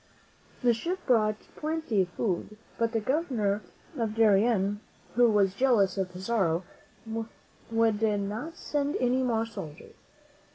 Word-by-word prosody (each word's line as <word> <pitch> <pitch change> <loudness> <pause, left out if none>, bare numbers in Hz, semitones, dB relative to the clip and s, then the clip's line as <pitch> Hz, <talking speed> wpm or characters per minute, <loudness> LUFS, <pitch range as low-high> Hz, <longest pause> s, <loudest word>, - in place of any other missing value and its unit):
The 240 -1 +5
ship 340 +11 -2
brought 215 -4 +3 0.2
plenty 310 -9 0
of 180 - -1
food; 200 +2 -2 0.2
but 230 -1 +2
the 230 - +1
Governor 220 - 0 0.3
of 225 -4 -2
Darien, 205 -2 +3 0.3
who 240 0 +5
was 200 -3 +3
jealous 210 -5 +3
of 190 -2 -2
Pizarro, 185 -2 0 1.1
would 225 -2 +2
not 215 +8 -1
send 290 0 -1
any 250 +1 +2
more 230 -3 +1
soldiers. 160 -10 -9
225 Hz, 125 wpm, -28 LUFS, 200-245 Hz, 1.1 s, The